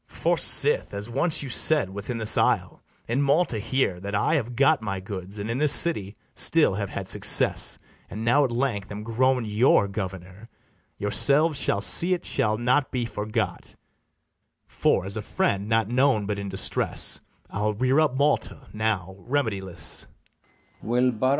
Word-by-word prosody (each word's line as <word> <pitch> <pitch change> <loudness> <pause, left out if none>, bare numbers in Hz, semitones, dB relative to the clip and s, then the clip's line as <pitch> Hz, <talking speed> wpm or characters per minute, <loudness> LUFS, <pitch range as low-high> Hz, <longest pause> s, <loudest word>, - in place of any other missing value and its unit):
For - - -1
sith, - - +2
as 105 +3 -5
once 150 +5 +1
you 135 - -7
said, 135 -4 +2
within 100 +5 -6
this 110 -1 +3
isle, - - 0 0.3
In 120 +5 -1
Malta 140 -4 +1
here, 115 -4 -1
that 100 +2 -5
I 100 - 0
have 125 -6 -2
got 140 +2 +3
my 100 -3 -4
goods, 95 0 -8
And 100 +1 -5
in 115 +3 -3
this 150 -1 +4
city 110 - +2 0.2
still - - +3
have - - -4
had - - -6
success, - - +2 0.3
And 110 +3 -6
now 140 +5 +3
at 135 - 0
length 120 -5 -3
am 105 +1 -7
grown 125 +2 0
your 105 -1 +2
governor, 95 +2 -8 0.5
Yourselves 140 +9 +2
shall 100 - 0
see 180 - +4
it 175 - -9
shall 110 0 0
not 125 +4 +1
be 125 -2 -3
forgot; 110 0 -4 0.9
For, - - 0
as 100 +2 -3
a - - -3
friend 100 0 -2
not 115 -2 +1
known 125 -3 +1
but 100 0 -4
in 100 -1 -6
distress, 95 - +2 0.3
I'll 105 +1 -2
rear 130 +6 +1
up 150 -5 +1
Malta, 140 -9 -1
now 105 -4 -3
remediless. 95 - -3
110 Hz, 160 wpm, -24 LUFS, 100-135 Hz, 0.9 s, this